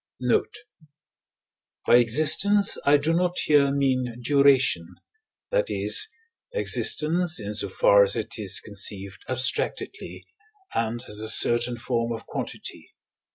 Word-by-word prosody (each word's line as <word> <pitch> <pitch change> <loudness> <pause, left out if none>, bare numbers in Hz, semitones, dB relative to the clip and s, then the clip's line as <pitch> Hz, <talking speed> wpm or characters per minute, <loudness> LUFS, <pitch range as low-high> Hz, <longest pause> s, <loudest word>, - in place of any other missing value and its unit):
Note. 125 - -1 1.3
By 120 - +5
existence 155 - +4
I 145 +1 +5
do 155 +3 -2
not 180 +1 -1
here 145 -2 +2
mean 130 -4 -2
duration 130 - +1 0.6
that - - -1
is, 430 - +1 0.5
existence 175 - +1
in 105 0 -7
so 100 -1 -2
far 100 +2 +3
as 100 0 +1
it 115 +1 -6
is 100 -3 0
conceived 100 0 -3
abstractedly, 130 +1 -2 0.5
and 115 +1 -3
as 105 - -2
a 110 0 -1
certain 120 +2 +3
form 120 0 -3
of 115 - -9
quantity. - - -8
125 Hz, 120 wpm, -23 LUFS, 110-150 Hz, 1.3 s, By